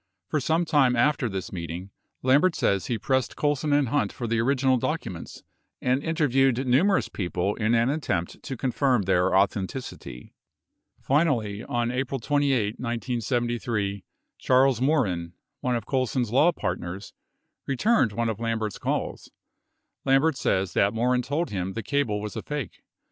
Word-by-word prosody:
For 155 - +1
some 160 +5 +1
time 135 -6 +3
after 125 0 +2
this 95 -2 -5
meeting, 85 +2 -6 0.3
Lambert 145 +7 +4
says 100 -1 +1
he 120 - -1
pressed 130 +4 0
Colson 145 0 0
and 145 -3 +3
Hunt 145 +3 +1
for 120 - -6
the 115 0 +1
orig 135 +4 +2
inal 130 -2 +3
documents 115 - -4 0.4
and 130 +2 +1
interviewed 135 -5 +2
numerous 165 +11 +3
people 90 +1 -2
in 110 +1 +1
an 115 +3 +3
attempt 140 - -2
to 135 -3 -6
confirm 130 -2 +1
their 90 -1 +2
authenticity. 95 - -2 0.7
Finally, 120 -8 +1
on 120 -1 -1
April 130 +1 -2
28, 130 -5 +1
1973, 120 -4 -2 0.4
Charles 130 -1 +3
Morin, 100 - +1 0.3
one 125 -1 0
of 115 - -3
Colson's 130 -3 -1
law 150 +8 +5
partners, 95 - -5 0.5
returned 140 - +2
one 115 +3 -1
of 110 -2 -3
Lambert's 115 -3 -2
calls. - - -3 0.7
Lambert 135 +3 +3
says 95 -7 0
that 100 +2 +2
Morin 125 +2 +2
told 145 +7 -2
him 95 -1 -3
the 115 - -4
cable 125 -4 0
was 105 0 -6
a - - -3
fake. 150 -1 -5
120 Hz, 150 wpm, -26 LUFS, 105-140 Hz, 0.7 s, law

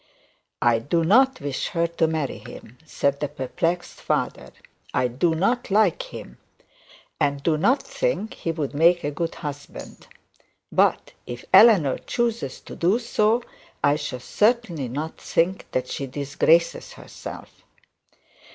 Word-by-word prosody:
'I 120 -1 +4
do 165 +8 0
not 260 +8 +4
wish 140 -2 -3
her 170 0 0
to 170 -1 0
marry 155 -3 -2
him,' 125 +3 -12
said 140 -1 0
the 145 - -1
perplexed 160 +5 -3
father; - - -2 0.4
'I 125 0 +2
do 160 +7 +1
not 235 +9 0
like 200 -3 +3
him, - - -10 0.8
and 140 0 0
do 165 - +2
not 220 - +2
think - - -2
he 165 - -3
would 155 -4 -3
make 170 +4 +4
a 145 - -1
good 165 +3 -3
husband. 145 -2 -8 0.6
But - - +2 0.2
if 120 0 -7
Eleanor 190 - +7
decides 235 - -2
to - - -10
do 185 +6 +2
so, 230 -1 +1 0.4
I 145 0 +4
shall 145 -4 -4
certainly 210 - +1
not 150 +6 -5
think 185 +3 0
that 125 0 -2
she 140 - -4
has 130 - -13
disgraced 150 +4 +1
herself.' - - -11
165 Hz, 140 wpm, -24 LUFS, 140-195 Hz, 0.8 s, Eleanor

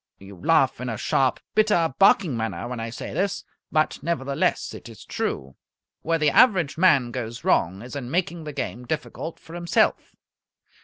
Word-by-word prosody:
You 95 +1 -12
laugh 135 - +2
in 125 - -3
a 115 - -3
sharp, 130 +4 +1
bitter, 210 -9 +3
barking 195 -7 +5
manner 110 -3 -3
when 125 -1 -5
I 115 0 -4
say 115 - -7
this, 195 +5 -1 0.3
but 155 0 +1
nevertheless 140 -3 -1
it - - -10
is - - -13
true. 65 0 -3 0.5
Where 165 +1 +1
the 150 -2 +2
average 185 - +4
man 140 -9 +4
goes 120 -2 -5
wrong 95 +5 +1
is 125 +3 -9
in 130 -4 -5
making 170 0 -2
the 150 - -5
game 125 -2 -4
difficult 160 +2 -4
for 165 - -14
himself. 170 -1 0
140 Hz, 170 wpm, -24 LUFS, 120-170 Hz, 0.5 s, barking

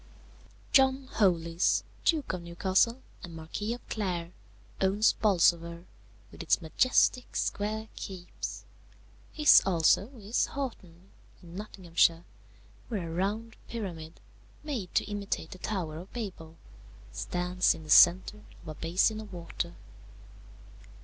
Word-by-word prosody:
"John 265 0 +4
Holies, 170 -4 +2 0.2
Duke 310 - +1
of 180 - -4
Newcastle, 190 +8 +1 0.2
and 170 -2 -9
Marquis 205 +8 -4
of 245 - -16
Clare, 180 -5 -3 0.5
owns 200 +3 +3
Bolsover, 170 -4 +2 0.5
with - - -10
its - - +2
majestic 250 - +2
square 215 +2 -2
keeps; 185 -2 -7 0.7
his 300 -1 +7
also 185 +1 +3
is 215 +2 0
Haughton, 190 -10 -7 0.3
in 170 -1 -13
Nottinghamshire, 175 -4 0 0.6
where 185 -8 -4
a - - -5
round 210 +6 -2
pyramid, 170 -8 -6 0.4
made 250 -12 -4
to - - +3
imitate 200 -5 -4
the 185 - -10
Tower 175 -8 -3
of 180 - -12
Babel, 180 -9 -7 0.6
stands 180 - 0
in 160 - -11
the 155 - -6
centre 185 +6 +6 0.2
of - - -10
a - - -5
basin 185 +8 +1
of 210 -2 -11
water. 170 -1 -5
185 Hz, 120 wpm, -29 LUFS, 170-215 Hz, 0.7 s, his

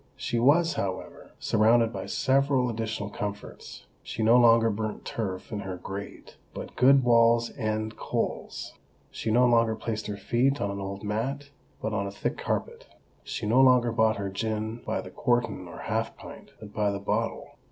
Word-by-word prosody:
She 120 - -2
was, 160 +7 +4
however, 95 -1 -5
surrounded 115 +1 +3
by - - -5
several 135 -2 +2
additional 110 -2 -4
comforts. 105 0 -7 0.2
She 110 - -4
no 115 +2 +6
longer 115 -2 +6
burnt 110 0 -4
turf 95 -4 -4
in 105 - -3
her 95 -2 -5
grate, 95 +3 -8 0.2
but - - -7
good 135 +1 +5
Wall's 115 -1 +4
End 110 -2 -2
coals. - - -3 0.4
She - - -4
no 120 +3 +4
longer 115 -2 +3
placed 110 -1 -4
her 105 -1 -4
feet 125 +7 +1
on 100 - -1
an 100 - -5
old 100 +1 -6
mat, 135 +7 -3 0.3
but 110 - -1
on 100 -1 -1
a - - -5
thick 100 - -3
carpet. - - -3 0.4
She - - -5
no 120 +5 +4
longer 125 -2 +5
bought 110 -1 +2
her 100 -1 -3
gin 110 +2 -3
by - - -1
the - - -10
quartern 120 -7 0
or 85 - -9
half - - -2
pint, - - -11
but 105 -1 -11
by 105 -1 +1
the 100 0 -3
bottle. 100 - -2
110 Hz, 175 wpm, -27 LUFS, 105-120 Hz, 0.4 s, no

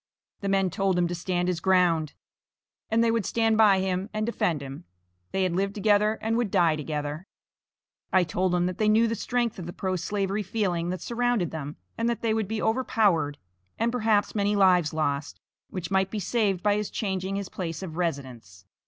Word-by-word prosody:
The 200 - -3
men 195 -2 +2
told 190 +1 +1
him 175 -1 +2
to - - -2
stand 175 +1 -1
his 180 -2 0
ground, 170 -5 +2 0.8
and 225 +1 +3
they 230 - +3
would 230 -2 +1
stand 225 +2 +1
by 205 -3 +5
him 190 +1 -1
and 215 0 -2
defend 175 -9 0
him, 140 0 -8 0.5
they 190 - 0
had 180 -2 0
lived 195 +2 -1
together, 210 +1 +3
and 225 +1 +1
would 240 -3 0
die 165 -4 +3
together. 150 +3 -4 0.8
I 185 -1 +4
told 180 +2 0
them 175 0 +2
that 180 0 -3
they 215 -1 +3
knew 225 +2 +4
the 230 - -1
strength 240 -1 -1
of 175 - -6
the 175 - -6
pro 185 -1 -2
slavery 195 +3 -1
feeling 180 -4 -1
that 185 0 -3
surrounded 240 -7 0
them, 150 -2 -5 0.2
and 230 +1 +1
that 235 - -2
they 225 -1 +2
would 220 -2 -1
be 220 +1 -3
overpowered, 205 - +1 0.4
and 230 +1 +1
perhaps 220 -4 +1
many 205 0 +1
lives 180 -5 +4
lost, 145 -2 -2 0.3
which 175 -2 -5
might 190 0 +2
be 215 - -4
saved 200 -2 0
by 205 0 +3
his 210 -1 -2
changing 190 -2 -2
his 200 -1 -4
place 165 -1 -5
of 165 -4 -6
residence. 130 - -4
190 Hz, 200 wpm, -26 LUFS, 170-215 Hz, 0.8 s, by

